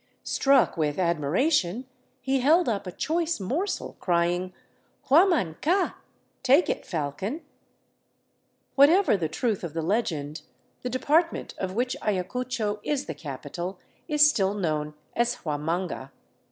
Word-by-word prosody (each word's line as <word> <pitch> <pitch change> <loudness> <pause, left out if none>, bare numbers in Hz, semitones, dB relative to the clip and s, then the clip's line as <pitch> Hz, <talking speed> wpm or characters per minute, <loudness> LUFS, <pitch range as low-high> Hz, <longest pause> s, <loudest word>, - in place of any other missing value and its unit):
Struck 270 -7 +3
with 150 -2 0
admiration, 180 - +1 0.4
he 265 +1 +1
held 320 +7 +4
up 205 -5 -1
a - - -4
choice 330 - -1
morsel 285 - -3
crying, 175 +1 0 0.3
'' - - -38
Huaman 300 - +4
ca! 365 +4 +1 0.2
— - - -43
Take 275 +6 +4
it, - - -5
falcon! 190 - -3 0.7
'* - - -46
Whatever 315 - +6
the 165 -5 -1
truth 210 +5 -1
of 165 -4 -5
the 165 - -1
legend, 160 -6 -1 0.4
the 250 - -3
depart 305 +7 +2
ment - - -7
of 190 -1 -3
which 250 +2 0
Ayacucho 215 +2 -2
is 285 +2 -2
the - - -5
capital 165 +6 -6 0.3
is 300 -2 +6
still 200 -8 +1
known 155 -5 -2 0.2
as 240 +1 +1
Huamanga. 155 -1 -2
205 Hz, 140 wpm, -26 LUFS, 170-275 Hz, 0.7 s, Whatever